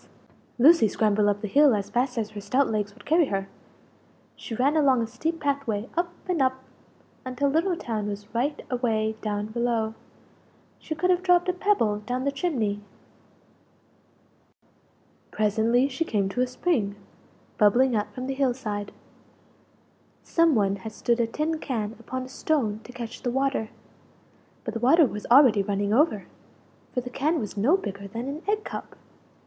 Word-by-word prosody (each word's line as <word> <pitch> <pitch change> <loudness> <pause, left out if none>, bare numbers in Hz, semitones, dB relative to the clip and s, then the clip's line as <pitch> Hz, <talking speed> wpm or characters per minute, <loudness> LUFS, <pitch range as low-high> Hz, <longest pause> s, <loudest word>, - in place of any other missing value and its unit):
Lucie 295 0 +6
scrambled 210 0 +2
up 205 0 0
the 215 - -3
hill 280 +2 +5
as 200 -1 -4
fast 250 +1 0
as 215 -2 -2
her 210 -1 -7
stout 255 +7 +1
legs 210 -2 -1
would - - -17
carry 320 0 +3
her; 195 -3 -2 0.9
she 225 - -7
ran 275 +6 +2
along 275 -5 +4
a 230 - 0
steep 315 +9 -3
path 280 -2 -1
way 215 +1 -2
up 345 +1 0 0.2
and 355 -5 0
up 260 0 0 0.6
until 255 +2 -1
Little 330 +6 +1
town 220 -9 -3
was 205 +1 -7
right 280 +6 -1
away 220 -3 0
down 205 -1 -2
below 230 -1 0 0.9
she 315 - -5
could 360 +4 +2
have 360 0 +2
dropped 360 0 +3
a - - +2
pebble 355 - +1
down 250 +4 -3
the 280 - +1
chimney! 255 - -1 2.5
Presently 225 +4 +2
she 280 +4 -2
came 205 -9 -1
to 250 +6 -2
a 255 - +2
spring, 250 - -1 0.6
bubbling 240 +4 +4
out 210 0 -1
from 255 +4 -6
the 270 - -2
hill 265 -2 +1
side. 205 -5 -4 1.3
Some 330 -3 +3
one 200 -2 +1
had 215 +3 -8
stood 235 0 0
a 230 - +2
tin 310 +6 -2
can 225 -6 -3
upon 255 0 -5
a - - -8
stone 260 -6 -1
to - - -10
catch 235 -1 -7
the 245 - -1
water 265 -3 0 0.9
but - - -4
the 230 - -3
water 295 +7 +5
was 210 -4 -5
already 245 -5 +6
running 200 +1 -1
over, 230 - +2 0.7
for 250 - -1
the 250 0 -8
can 305 +6 0
was 210 -2 -5
no 250 - +3
bigger 200 - -6
than 230 +5 -5
an 290 +3 -5
egg 425 +1 0
cup! - - -7
245 Hz, 170 wpm, -26 LUFS, 210-285 Hz, 2.5 s, Lucie